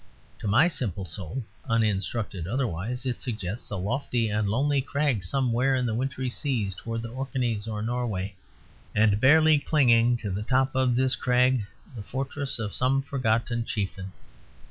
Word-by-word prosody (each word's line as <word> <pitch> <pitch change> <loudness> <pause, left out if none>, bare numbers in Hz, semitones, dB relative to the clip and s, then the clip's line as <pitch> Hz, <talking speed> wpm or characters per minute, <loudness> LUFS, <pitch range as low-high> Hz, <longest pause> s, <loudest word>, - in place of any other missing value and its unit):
To - - -4
my 120 - +5
simple 100 - -3
soul 95 - -5 0.3
(uninstructed 105 -4 0
otherwise) 120 +1 -2
it 125 -2 -2
suggests 110 -3 -4
a - - -3
lofty 115 +3 -1
and 105 -1 0
lonely 140 +5 +2
crag 140 -6 0
somewhere 130 +5 +1
in 125 -1 0
the 115 - 0
wintry 130 +2 -2
seas 120 -6 -1
towards 115 +4 -5
the 115 - -5
Orkheys 125 -4 -2
or 105 -1 -3
Norway; 110 -5 -2 0.6
and 105 -1 +3
barely 155 +2 +6
clinging 120 -5 +4
to 105 -4 -5
the 95 +3 -2
top 130 +4 +1
of 130 -2 +2
this 130 +1 +2
crag 125 -3 +2 0.3
the 110 - -6
fortress 135 +4 -3
of 110 -3 -4
some 135 +2 +2
forgotten 120 -3 0
chieftain. 95 -4 -4
120 Hz, 155 wpm, -27 LUFS, 105-130 Hz, 0.6 s, barely